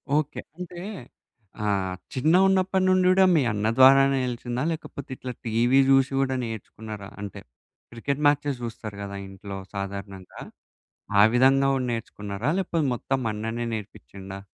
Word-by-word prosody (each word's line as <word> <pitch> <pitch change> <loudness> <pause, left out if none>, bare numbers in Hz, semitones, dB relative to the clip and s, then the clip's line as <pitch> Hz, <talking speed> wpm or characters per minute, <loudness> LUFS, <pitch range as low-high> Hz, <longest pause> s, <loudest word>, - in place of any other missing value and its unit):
Okay 150 -1 -1 0.2
అంటే 175 -1 -7 0.9
ఆహ్, 95 -2 0 0.2
చిన్నగున్నప్పటి 185 +6 +3
నుండి 185 0 +3
కూడా 190 0 +5
మీ 150 - +4
అన్న 105 +1 -1
ద్వారానే 135 +1 +6
ఎలిసిందా? 120 +1 -3
లేకపోతే 145 -4 -7
ఇట్లా 125 - -6
టీవీ 120 +4 +3
చూషి 135 0 +4
గూడా 130 -1 +1
నేర్చుకున్నారా? 110 -2 -7
అంటే 100 0 -7 0.5
క్రికెట్ 140 +5 -3
మాచెస్ 145 -3 +1
చూస్తారు 110 -3 -6
కదా 100 0 -6
ఇంట్లో 95 +1 -8 0.2
సాధారణంగా. 100 -1 -7 0.8
ఆ - - +9
విధంగా 135 +2 +5
గూడా 130 -1 -1
నేర్చుకున్నారా? 105 +1 -4
లేకపోతే 170 -5 -1
మొత్తం 135 +2 -2
అన్ననే 115 +2 -3
నేర్పించిండా? 95 - -8
120 Hz, 130 wpm, -25 LUFS, 105-140 Hz, 0.9 s, ఆ